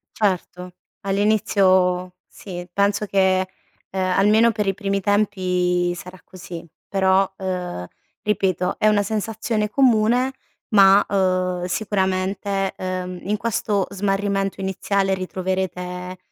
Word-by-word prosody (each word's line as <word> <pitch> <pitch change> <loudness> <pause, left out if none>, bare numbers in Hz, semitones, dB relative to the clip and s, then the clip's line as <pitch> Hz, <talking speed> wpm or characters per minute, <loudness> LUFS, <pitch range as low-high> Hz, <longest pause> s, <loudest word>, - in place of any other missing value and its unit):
Certo. 180 -3 -2 0.3
All'inizio 190 -3 +2
sì. 175 -3 -9
Penso 200 +2 +1
che, 190 -1 +2 0.4
uhm, 190 - -3
almeno 205 +5 +4
per 210 -2 -2
i 195 - +1
primi 200 -1 -1
tempi 180 -3 +1
sarà 180 +1 -10
così. 180 -2 -9 0.2
Però, 190 0 +2
uhm, 180 - -4 0.3
ripeto 185 -3 0
è 215 - +2
una 210 -1 +4
sensazione 215 +1 -2
comune 245 +1 +3 0.4
ma, 200 -1 +6
uhm, 185 -2 0
sicuramente, 195 0 -1
ehm, 185 -1 -4
in 210 +2 -1
questo 210 -3 0
smarrimento 195 0 -1
iniziale 195 0 0
ritroverete, 185 -1 -4
195 Hz, 105 wpm, -22 LUFS, 185-205 Hz, 0.4 s, ma